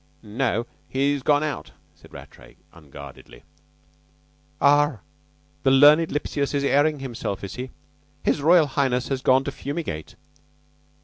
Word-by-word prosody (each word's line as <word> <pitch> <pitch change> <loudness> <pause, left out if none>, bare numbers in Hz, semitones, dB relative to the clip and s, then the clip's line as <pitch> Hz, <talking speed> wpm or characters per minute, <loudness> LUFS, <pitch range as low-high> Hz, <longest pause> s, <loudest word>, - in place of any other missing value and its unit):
"No, 115 +2 -1 0.2
he's 140 +1 0
gone 145 +2 +2
out," 150 -1 -5 0.2
said - - -20
Rattray - - -14 0.2
unguardedly. 70 -5 -13 1.2
"Ah! 145 -4 +3 0.6
The 135 - +2
learned 150 +4 +6
Lipsius 145 -1 -2
is 140 - 0
airing 145 +1 +2
himself, 115 -7 -5
is 100 - -6
he? 130 +1 -6 0.5
His - - +1
Royal 165 +2 +5
Highness 130 -3 -1
has 135 -2 -2
gone 130 +1 +3
to 140 - -4
fumigate." 140 - -6
135 Hz, 125 wpm, -23 LUFS, 125-145 Hz, 1.2 s, learned